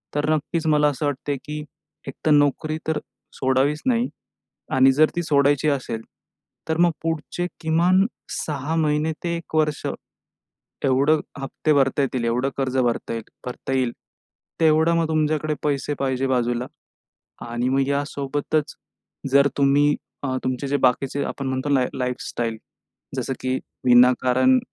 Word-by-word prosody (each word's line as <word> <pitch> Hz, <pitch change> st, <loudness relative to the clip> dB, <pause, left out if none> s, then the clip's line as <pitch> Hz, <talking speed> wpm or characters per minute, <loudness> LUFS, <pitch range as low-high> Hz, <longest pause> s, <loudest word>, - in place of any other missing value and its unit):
तर 145 Hz, +1 st, 0 dB
नक्कीच 160 Hz, +2 st, -2 dB
मला 150 Hz, -1 st, +4 dB
असं 145 Hz, +1 st, -3 dB
वाटतंय, 145 Hz, 0 st, -2 dB
की 150 Hz, 0 st, -5 dB, 0.4 s
एकतर 155 Hz, -, -2 dB
नोकरी 145 Hz, +2 st, +2 dB
तर 160 Hz, -, +1 dB, 0.4 s
सोडावीच 135 Hz, +3 st, +1 dB
नाही. 245 Hz, 0 st, +2 dB, 0.6 s
आणि 130 Hz, 0 st, +6 dB
जर 155 Hz, +2 st, +4 dB
ती 175 Hz, -, 0 dB
सोडायची 145 Hz, 0 st, +3 dB
असेल, 130 Hz, -5 st, -2 dB, 0.7 s
तर 160 Hz, -, +1 dB
मग 175 Hz, -, +5 dB
पुढचे 165 Hz, +2 st, -2 dB
किमान 175 Hz, +4 st, +3 dB, 0.3 s
6 150 Hz, +1 st, -3 dB, 0.5 s
ते 170 Hz, -, -1 dB
1 170 Hz, -1 st, -8 dB
वर्ष, 150 Hz, -2 st, +1 dB, 1.0 s
एवढं 140 Hz, +4 st, +3 dB, 0.2 s
हप्ते 135 Hz, +3 st, -1 dB
भरता 135 Hz, +1 st, +2 dB
येतील, 130 Hz, -3 st, -1 dB
एवढं 125 Hz, +4 st, 0 dB
कर्ज 130 Hz, -1 st, 0 dB
भरता 120 Hz, -3 st, 0 dB
येईल 115 Hz, -, -4 dB, 0.2 s
भरता 125 Hz, +1 st, -5 dB
येईल 130 Hz, -3 st, +1 dB, 0.7 s
तेवढं 160 Hz, +1 st, +4 dB
मग 165 Hz, -1 st, +1 dB
तुमच्याकडे 155 Hz, -1 st, 0 dB
पैसे 145 Hz, 0 st, 0 dB
पाहिजे 135 Hz, -1 st, 0 dB
बाजूला. 120 Hz, -1 st, 0 dB, 0.8 s
आणि 120 Hz, +2 st, -1 dB
मग 135 Hz, 0 st, +2 dB
यासोबतच, 145 Hz, +1 st, -1 dB, 0.6 s
जर 140 Hz, +1 st, +6 dB
तुम्ही 145 Hz, +1 st, +4 dB, 0.3 s
अ, -, -, -1 dB, 0.2 s
तुमचे 130 Hz, +2 st, -2 dB
जे 145 Hz, -, +2 dB
बाकीचे, 135 Hz, +3 st, -2 dB
आपण 140 Hz, -, -4 dB
म्हणतो 130 Hz, +2 st, -2 dB
लाईफ, 130 Hz, -3 st, +3 dB
लाईफस्टाईल, 120 Hz, -3 st, -3 dB, 0.6 s
जसं -, -, -2 dB
की 130 Hz, 0 st, -1 dB, 0.3 s
विनाकारण 125 Hz, +1 st, +5 dB
140 Hz, 135 wpm, -23 LUFS, 130-155 Hz, 1.0 s, आणि